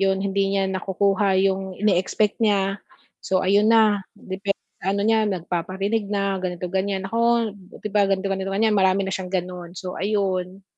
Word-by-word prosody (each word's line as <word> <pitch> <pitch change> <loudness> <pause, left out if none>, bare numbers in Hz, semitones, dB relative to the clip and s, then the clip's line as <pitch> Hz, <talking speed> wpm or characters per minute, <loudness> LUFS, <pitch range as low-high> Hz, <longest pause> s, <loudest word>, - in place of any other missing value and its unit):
yun 195 0 +2
hindi 195 0 0
niya 195 0 +1
nakukuha 190 +1 +1
yung 190 -1 -1
ine-expect 205 +1 +1
niya. 200 -2 +1 0.4
So 185 -1 0
ayun 200 +3 +4
na, 220 -3 +5 0.2
depen 195 +1 -3 0.2
ano 200 +2 0
niya 220 -1 +3
nagpaparinig 190 +4 -2
na, 200 -2 -1
ganito 180 -1 -4
ganyan, 190 0 -1
naku, 230 +1 +1 0.2
'di 210 - -6
ba 205 -2 +3
ganito, 195 0 0
ganito, 190 0 -3
ganyan. 215 +3 +2
Marami 190 -1 +3
na 190 - -3
siyang 185 -1 -3
gano'n. 180 -1 -4
So, 180 +1 -5
ayun. 190 -2 -2
195 Hz, 160 wpm, -23 LUFS, 190-205 Hz, 0.4 s, na